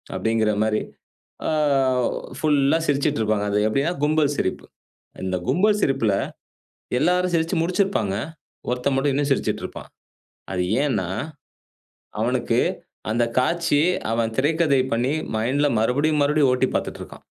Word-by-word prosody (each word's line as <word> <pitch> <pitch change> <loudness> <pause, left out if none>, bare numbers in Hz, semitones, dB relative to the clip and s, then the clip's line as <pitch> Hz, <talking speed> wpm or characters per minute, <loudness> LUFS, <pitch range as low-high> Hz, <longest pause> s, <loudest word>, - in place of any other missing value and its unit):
அப்டிங்கிற 110 -1 +1
மாரி. 110 0 0 0.7
ஆ, - - +1 0.9
புல்லா 145 0 +3
சிரிச்சிட்டு 145 0 +1
இருப்பாங்க. 105 -1 0
அது 105 - +2
எப்டின்னா, 140 +10 0
கும்பல் 150 -1 +2
சிரிப்பு. 95 - -2 0.6
இந்த 95 0 -1
கும்பல் 210 +3 +3
சிரிப்புல 135 -7 +2 0.9
எல்லாரும் 180 +4 +2
சிரிச்சு 165 +2 +1
முடிச்சிருப்பாங்க. 180 - 0 0.5
ஒருத்தன் 125 +2 0
மட்டும் 140 +1 +1
இன்னும் 140 +1 0
சிரிச்சிட்டு 135 - 0
இருப்பான். - - -8 0.6
அது 90 -1 0 0.2
ஏன்னா, 95 -11 -1 1.1
அவனுக்கு, - - +1 0.5
அந்த 120 +1 +2 0.2
காட்சி, 155 +1 +1 0.3
அவன் 115 -1 0
திரைக்கதை 150 0 +2
பண்ணி 125 +5 0 0.2
மைண்ட்ல 135 +7 +1
மறுபடியும் 145 +7 +1
மறுபடியும் 145 -1 +3
ஓட்டி 130 +1 +2
பார்த்துட்ருக்கான். - - -5
140 Hz, 115 wpm, -23 LUFS, 115-155 Hz, 1.1 s, புல்லா